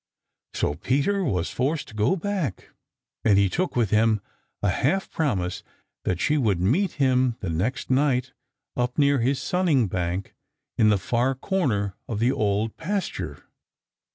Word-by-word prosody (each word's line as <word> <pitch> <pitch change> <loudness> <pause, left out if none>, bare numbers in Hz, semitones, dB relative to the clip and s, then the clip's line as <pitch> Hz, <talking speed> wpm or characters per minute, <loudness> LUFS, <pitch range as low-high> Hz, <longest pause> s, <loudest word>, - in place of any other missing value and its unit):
So 70 - 0
Peter 145 - 0
was 90 - -1
forced 145 +4 -1
to - - -13
go 110 - +2
back, 185 - -3 0.5
but 105 -3 +4
he 100 -1 +4
took 180 - -1
with 115 -5 +1
him 110 0 +3 0.4
a 100 - +3
half 180 - 0
promise 95 - -1 0.4
that 90 -2 0
she 150 0 +2
would 105 -9 +1
meet 155 - +2
him 130 -3 +2
the 95 - -2
next 110 +12 -2
night 130 -1 +2 0.4
up 125 0 -1
near 140 -2 +4
his 130 +3 +1
sunning 170 -9 +2
bank 90 0 -3 0.4
in 110 - +4
the 105 - +4
far 120 +7 0
corner 125 - 0
of 110 - -3
the 120 +4 +2
Old 105 -1 0
Pasture. 195 +4 -3
125 Hz, 155 wpm, -25 LUFS, 100-145 Hz, 0.5 s, but